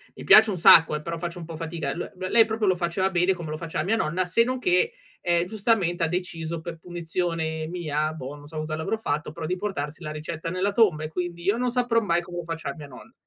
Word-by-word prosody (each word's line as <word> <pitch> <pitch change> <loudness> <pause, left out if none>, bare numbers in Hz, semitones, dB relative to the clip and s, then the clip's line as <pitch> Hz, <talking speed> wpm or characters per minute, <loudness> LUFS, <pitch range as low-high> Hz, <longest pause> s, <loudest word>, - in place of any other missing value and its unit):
mi - - -9
piace 215 0 +8
un 190 - -2
sacco, 160 -1 +7
eh, 150 - -8
però 170 +1 -4
faccio 175 +1 -5
un 165 - -7
po' 165 -1 -8
fatica. 160 -3 -4
L 175 - -5
l 185 - -4
lei, 230 -1 +7
proprio 220 -1 -1
lo 185 - +4
faceva 175 +2 0
bene 180 +1 +2
come 170 -4 -7
lo - - -2
faceva 160 -1 -3
mia 220 +3 +2
nonna, 185 -3 0
se 205 +6 +3
non 255 +1 -2
che, 370 - +2 0.3
ehm, 175 0 +2
giustamente 195 -5 0
ha 160 - +1
deciso 170 -2 -3
per 165 0 -7
punizione 165 -2 -3
mia, 155 -3 -2
boh, 145 -2 -7
non 145 0 -13
so 155 +1 -9
cosa 155 0 -3
le 160 - -4
avrò 225 - -1
fatto, 150 -8 -2
però 160 0 -6
di 180 +3 -1
portarsi 170 -5 -4
la 150 - -4
ricetta 160 +2 -5
nella 190 +3 -1
tomba, 175 -9 +3
e - - -2
quindi 170 +1 -4
io 200 +4 +2
non 250 0 0
saprò 245 -2 +2
mai 175 -4 +1
come 175 0 -8
lo 175 - -4
faceva 165 0 -5
mia 150 -3 -9
nonna. 130 - -14
170 Hz, 260 wpm, -25 LUFS, 160-190 Hz, 0.3 s, piace